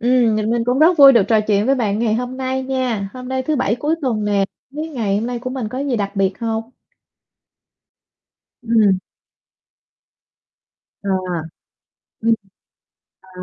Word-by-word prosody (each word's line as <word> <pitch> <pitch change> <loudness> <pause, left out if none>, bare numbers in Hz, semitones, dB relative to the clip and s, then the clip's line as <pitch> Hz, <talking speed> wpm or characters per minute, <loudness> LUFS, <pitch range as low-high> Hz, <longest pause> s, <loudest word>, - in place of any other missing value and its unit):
Ừm, 240 -2 +3
nh 215 +1 -1
mình 235 0 0
cũng 250 +2 +1
rất 325 +2 +5
vui 275 -1 +10
được 235 -5 +5
trò 220 -2 +4
chuyện 210 0 +1
với 275 - +4
bạn 215 -5 -1
ngày 225 -2 +1
hôm 250 +2 -3
nay 260 0 -2
nha. 255 -6 -2
Hôm 250 0 -8
nay 260 0 -1
thứ 300 +3 -1
Bảy 240 -4 +1
cuối 295 +6 -1
tuần 225 -6 -1
nè, 200 -1 +2 0.3
hông 300 +2 -4
biết 320 - -5
ngày 225 -10 -1
hôm 220 - -2
nay 245 0 -3
của 255 +2 -5
mình 255 -4 -4
có 255 - -6
gì 275 -3 -1
đặc 200 -1 -3
biệt 195 -1 0
hông? 225 0 -3 1.9
Ừm. 220 -5 +3 2.0
À. 200 - -5 1.1
Ừm. 230 0 +3 0.9
À. 185 -1 -11
235 Hz, 170 wpm, -19 LUFS, 215-260 Hz, 2.0 s, vui